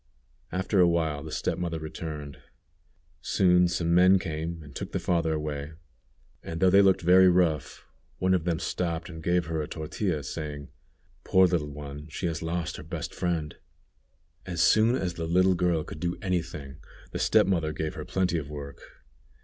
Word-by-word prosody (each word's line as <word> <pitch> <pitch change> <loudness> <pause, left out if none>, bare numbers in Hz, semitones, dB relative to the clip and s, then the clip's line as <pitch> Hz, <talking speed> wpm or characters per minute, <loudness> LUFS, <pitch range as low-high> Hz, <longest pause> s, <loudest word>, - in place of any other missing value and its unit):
After 95 +2 0
a 90 - +7
while 80 -4 0
the 80 - -8
step - - -2
mother 85 -2 -2
returned. 75 -2 -7 0.8
Soon 90 -1 +4
some 85 -1 0
men 90 +2 +6
came 80 -1 -4
and 70 -1 -13
took - - -6
the - - 0
father 85 -2 0
away, 75 -1 -4 0.7
and 80 0 -6
though 95 0 +4
they 100 +1 +7
looked 95 -2 +3
very 90 +2 +7
rough, 80 -6 +1 0.3
one 95 0 +2
of 90 -3 +1
them 85 -1 0
stopped 85 +1 -3
and 80 -2 -8
gave 90 +1 +1
her 80 -1 -2
a 75 - -4
tortilla, 80 0 -3
saying: 75 0 -6 0.5
"Poor 95 0 +5
little 85 -4 0
young 70 - -9
one, 75 0 -8
she 80 +4 -5
has 80 -1 -2
lost 85 0 -3
her - - -9
best 85 +1 -5
friend." 85 -4 -2 0.9
As 85 -2 -1
soon 110 +3 +4
as 90 -8 -2
the 85 -1 -4
little 95 +3 +4
girl 85 -3 +1
could 75 - -9
do 85 +2 -2
any 90 -2 0
thing, 75 -5 -9 0.3
the - - -4
step - - +4
mother 85 -5 0
gave 75 0 -3
her - - -6
plenty 90 -3 0
of 70 -2 -8
work. 70 -1 -8
85 Hz, 185 wpm, -27 LUFS, 75-90 Hz, 0.9 s, a